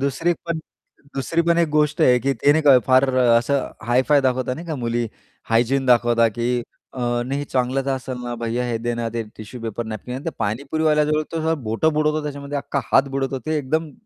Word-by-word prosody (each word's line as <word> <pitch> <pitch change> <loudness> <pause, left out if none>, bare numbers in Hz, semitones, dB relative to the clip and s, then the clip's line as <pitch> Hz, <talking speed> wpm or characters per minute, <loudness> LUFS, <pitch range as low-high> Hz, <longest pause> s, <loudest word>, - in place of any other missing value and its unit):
दुसरी 140 +5 0
एक 175 - 0
पण 170 -1 -1 0.6
दुसरी 165 +5 0
पण 170 0 +2
एक 170 -2 +3
गोष्ट 150 +2 +1
आहे, 125 -4 +5
की 135 +2 +1
ते 140 +4 +3
नाही 145 -4 +6
फार 130 +1 +5
असं 125 +2 +2 0.2
हाय-फाय 130 +4 +3
दाखवतात 130 -1 0
नाही 170 +5 -9
का 160 - -3
मुली, 120 -2 -1 0.4
हायजीन 125 +4 +2
दाखवतात 120 -2 +4
की 120 +1 -1 0.4
अ, 130 - -7 0.3
नाही, 135 +2 -2
"हे 145 - -3
चांगलंच 130 0 -1
असेल 130 -1 -3
ना 120 0 -4
भैय्या, 115 +2 -1
हे 115 -1 -1
दे 120 0 0
ना, 115 -1 -2
ते 115 - -1
टिश्यू 110 +3 -9
पेपर, 115 +1 -4
नॅपकिन." 110 +3 -6
आणि 140 +6 -4
पाणीपुरीवाल्याजवळ 150 +7 +1
तो 160 0 0
बोटं 150 +9 +1
बुडवतो 150 0 +1
त्याच्यामध्ये, 145 -1 -5
अख्खा 140 0 -2
हात 135 - +5
बुडवतो 135 -1 -1
ते 155 0 0
एकदम 155 +3 -1
135 Hz, 195 wpm, -22 LUFS, 120-150 Hz, 0.6 s, नाही